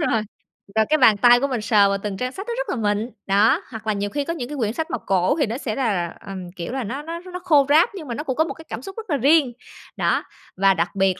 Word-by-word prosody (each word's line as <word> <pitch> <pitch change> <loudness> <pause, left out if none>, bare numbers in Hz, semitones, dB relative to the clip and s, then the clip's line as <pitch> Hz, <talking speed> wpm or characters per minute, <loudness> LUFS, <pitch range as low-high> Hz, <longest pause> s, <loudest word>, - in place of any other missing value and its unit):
Đúng - - +1
rồi, 225 -2 +1 0.5
và 220 0 +4
cái 310 - +4
bàn 225 -7 +6
tay 240 +3 +6
của 280 - 0
mình 250 -5 -2
sờ 205 -1 +4
vào 200 - 0
từng 195 -1 -5
trang 250 0 -2
sách 390 +8 -8
nó 475 - -2
rất - - -3
là - - -1 0.2
mịn. 220 +4 -3 0.2
Đó, 215 - +4
hoặc 225 -1 -8
là 215 - +2
nhiều 200 0 -2
khi 285 +3 -2
có 335 - -2
những 250 -7 -5
cái 295 - -5
quyển 220 -2 -1
sách 320 +3 -4
mà - - 0
cổ 190 0 +1
thì 285 - +3
nó 230 +3 -4
sẽ 220 -6 -4
là 240 -6 0
là, 175 -2 -3
ờm, 185 -3 -8
kiểu 175 +7 -5
là, 265 - -2
nó 260 +7 -4
nó 330 +2 -6
nó 360 0 -8
khô 295 -6 +4
ráp 315 +5 +5
nhưng 315 -7 -8
mà 235 - -4
nó 300 - -4
cũng 260 -4 -2
có 315 - +3
một - - -5
cái 320 - -14
cảm 225 - -5
xúc 385 +7 -9
rất 445 -4 -8
là 290 - +1
riêng. 280 -1 +4 0.4
Đó, - - +1 0.3
và 195 0 +4
đặc 170 +3 -2
biệt 190 -1 +1
245 Hz, 310 wpm, -22 LUFS, 205-300 Hz, 0.5 s, bàn